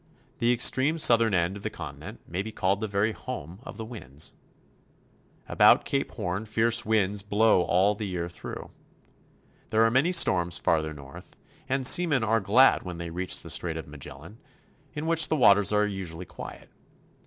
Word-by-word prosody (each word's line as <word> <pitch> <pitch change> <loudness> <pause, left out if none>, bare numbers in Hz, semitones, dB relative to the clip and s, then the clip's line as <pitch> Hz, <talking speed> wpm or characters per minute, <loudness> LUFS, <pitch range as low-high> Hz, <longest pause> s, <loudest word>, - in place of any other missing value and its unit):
The 120 +1 +2
ex 120 0 +5
treme 150 +5 -1
southern 115 -7 +4
end 90 +2 0
of - - -11
the - - -3
continent - - -10
may 90 +3 -3
be 110 +2 -7
called 95 -1 -1
the 110 - -3
very 100 +2 0
home 85 -3 -8
of - - -11
the 110 - -6
winds. 80 - -8 1.1
About - - +4
Cape - - -2
Horn 95 +5 -4
fierce 115 +2 +1
winds 105 -2 0
blow 105 -1 +2
all 95 +4 +2
the 105 0 -6
year 90 -2 -4
through. 85 - -9 1.0
There 110 +1 +2
are 115 - +3
many 135 +8 +2
storms 90 - +3
farther 80 -2 -1
north, 70 -1 -13 0.3
and 135 0 -1
seamen 145 -4 +4
are 110 +1 +1
glad 110 +7 +4
when 90 -2 -8
they 85 0 -7
reach 90 +2 -2
the - - -8
Strait - - -1
of - - -8
Magellan, 80 - -11 0.6
in 150 +1 -4
which 165 -1 +3
the - - 0
waters 100 -7 +4
are 105 0 +2
usually 90 -4 -6
quiet. - - -11
105 Hz, 175 wpm, -26 LUFS, 90-115 Hz, 1.1 s, ex